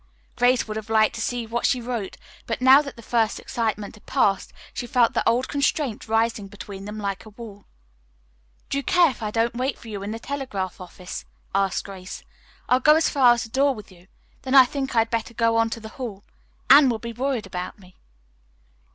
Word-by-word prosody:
Grace 245 0 +3
would 215 0 -4
have 220 0 -7
liked 220 -1 +3
to - - -5
see 245 -1 -2
what 235 +1 -3
she 250 - +2
wrote, 235 -5 -4 0.3
but - - -2
now 260 +2 +7
that 280 -2 -8
the 230 - -13
first 225 -1 0
excitement 215 -3 -3
had 210 - -19
passed 195 -1 +1 0.2
she 245 - -5
felt 240 -1 +3
the - - +2
old 245 +3 +1
constraint 280 -5 -1
rising 225 -2 0
between 195 0 -9
them 210 +1 -7
like 200 -2 -3
a 220 - -12
wall. 210 -2 -11 1.1
"Do 280 - +1
you - - -5
care 350 -2 +4
if 240 - -13
I 215 - -2
don't 225 +2 0
wait 255 +2 -2
for 230 - -12
you 205 -2 -5
in 200 - -5
the 220 - -4
telegraph 230 -9 -5
office?" 180 0 -8 0.3
asked 195 -1 +1
Grace. 190 -1 -9 0.4
"I'll 250 - +4
go 300 +4 +6
as 320 - +2
far 255 -4 +6
as 235 - -3
the 225 - -9
door 275 +3 +2
with 210 -3 -11
you. 180 0 -19 0.3
Then 265 +1 -1
I 265 -1 +10
think 270 0 -4
I 225 - +6
had 225 - -3
better 230 0 -2
go 230 0 +2
on 225 0 +3
to 230 - -5
the 220 -1 -9
Hall. 215 -5 -7 0.4
Anne 280 -1 +8
will 235 - 0
be 235 +1 -7
worried 255 -2 -2
about 180 -1 -6
me." 185 -2 -18
230 Hz, 220 wpm, -24 LUFS, 210-255 Hz, 1.1 s, I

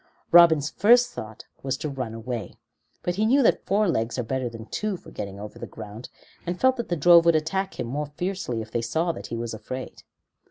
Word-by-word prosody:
Robin's 160 -4 +6
first 245 +3 +5
thought 110 - -9 0.2
was 135 0 -2
to 155 - -4
run 130 -6 -4
away, 115 -4 -5 0.5
but 175 +1 -2
he 215 - +2
knew 270 +4 +4
that - - +2
four 210 +2 +2
legs 115 -8 -1
are 125 - -1
better 130 +1 -2
than 115 -1 -9
two 210 - -3
for - - -15
getting 100 -1 -6
over 105 +1 -9
the - - -6
ground, 110 +2 -9 0.3
and 175 +1 -4
felt 260 0 +4
that 235 -2 -5
the 175 - 0
drove 170 +2 +7
would 170 -1 +4
attack 190 +5 -1
him - - -1
more 145 +5 -3
fiercely 180 -11 -2
if 110 - -15
they 120 - -1
saw 160 +9 0
that - - -8
he - - -5
was 115 -1 -4
afraid. 125 +4 -7
145 Hz, 225 wpm, -25 LUFS, 115-180 Hz, 0.5 s, drove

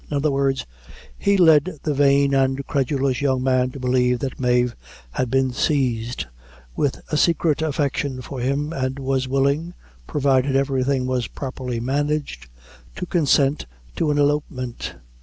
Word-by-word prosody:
In 145 - -1
other 145 +1 +1
words, 135 -1 0 0.5
he 200 - +2
led 160 -1 +4
the 150 - 0
vain 140 0 +3
and 135 0 +1
credulous 135 -2 0
young 130 -2 +1
man 130 -1 +2
to 135 - -9
believe 125 -1 +2
that 130 +1 -5
Mave 125 -1 +2 0.4
had 125 - -2
been 130 0 +1
seized 125 -5 0 0.5
with 140 - -1
a 150 - +1
secret 160 -2 +2
affection 145 -3 -1
for 135 0 -7
him, 140 +5 -1
and 130 -2 -2
was 135 -1 -1
willing, 140 +6 0 0.3
provided 135 -1 +1
everything 135 -1 +1
was 125 -3 -1
properly 130 -3 -5
managed, 140 - -2 0.5
to - - -4
consent 145 - +2 0.3
to 160 - 0
an 145 - +1
elopement. 145 -4 -1
135 Hz, 145 wpm, -22 LUFS, 130-145 Hz, 0.5 s, led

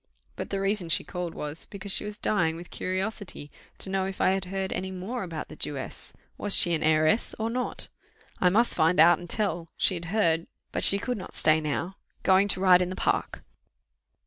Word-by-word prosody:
But - - -6
the 195 - -2
reason 195 -3 0
she - - +2
called 180 -2 -5
was, 150 +2 -2
because 200 0 -6
she 205 - 0
was 210 0 -6
dying 165 -9 0
with 170 -1 -10
curiosity 185 -5 -4 0.3
to - - -1
know 190 -1 0
if 195 - -7
I - - +3
had 190 0 -1
heard 190 +1 -3
any 185 +1 -3
more 190 +7 -5
about 165 -4 -5
the - - -11
Jewess. 140 -2 -4 0.2
Was 205 - +4
she 175 - +6
an 160 - 0
heiress 155 +7 +2
or 225 +1 -2
not? 250 +1 0 0.5
I 180 - +4
must 230 +6 +3
find 160 +1 +2
out 170 +1 +7
and 175 -1 -10
tell: 175 -6 -1
she - - +3
had 170 -1 -5
heard 165 -3 +1 0.2
but - - -2
she 200 - +5
could 230 +2 -3
not 185 - -9
stay 155 0 +4
now 165 +5 -3 0.3
going 190 +1 +4
to 195 - +2
ride 185 -1 +6
in 180 - -1
the 185 - -5
park. - - -1
185 Hz, 210 wpm, -27 LUFS, 165-200 Hz, 0.5 s, out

